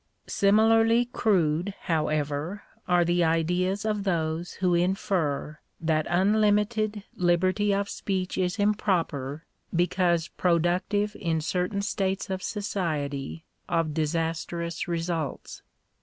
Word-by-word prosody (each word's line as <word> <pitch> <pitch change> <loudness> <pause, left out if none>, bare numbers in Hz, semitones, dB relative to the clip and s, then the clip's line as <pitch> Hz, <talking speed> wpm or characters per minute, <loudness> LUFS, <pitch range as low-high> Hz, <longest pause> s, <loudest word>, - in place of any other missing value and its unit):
Similarly 225 +3 +4
crude, 190 -6 +1
however, 155 +3 -1 0.2
are 175 -1 +4
the 175 +1 +2
ideas 180 +5 +1
of 210 -2 0
those 170 -2 -1
who 180 -2 +1
infer 170 -4 0 0.2
that 160 -1 0
unlimited 210 +2 +2
liberty 185 +4 +2
of 200 0 0
speech 190 -2 -3
is 180 +2 0
improper, 165 -9 0 0.3
because 175 -1 +2
productive 180 +4 +1
in 165 -2 0
certain 180 +5 -1
states 195 -1 -1
of 190 0 -2
society 160 -8 -3 0.2
of 165 -3 0
disastrous 165 +2 -2
results. 165 -3 -3
180 Hz, 100 wpm, -27 LUFS, 165-200 Hz, 0.3 s, Similarly